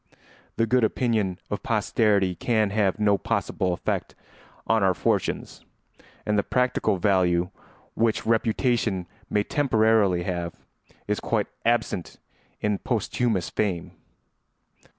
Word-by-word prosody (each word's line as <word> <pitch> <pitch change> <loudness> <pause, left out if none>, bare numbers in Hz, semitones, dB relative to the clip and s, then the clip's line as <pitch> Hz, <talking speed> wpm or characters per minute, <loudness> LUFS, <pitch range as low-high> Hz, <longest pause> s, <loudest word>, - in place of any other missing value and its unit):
The 115 - +2
good 125 +2 +2
opinion 110 -5 +1
of - - -2
posterity 100 -4 +2
can 110 +3 +1
have 105 -1 +1
no 105 -2 +3
possible 90 +2 -1
effect 90 - -3 0.5
on 110 -1 +2
our 95 -2 +3
fortunes, - - -1 0.6
and 105 -1 +2
the - - +1
practical 125 -5 +1
value 90 -2 +2 0.4
which 115 -1 0
reputation 110 -3 +1 0.2
may 105 - +1
temporarily 110 -9 +2
have 85 -2 -3 0.5
is - - 0
quite - - 0 0.2
absent 115 -6 0 0.4
in 105 -1 0
posthumous 110 -5 -1
fame. 95 -6 -1
105 Hz, 110 wpm, -25 LUFS, 95-115 Hz, 0.6 s, no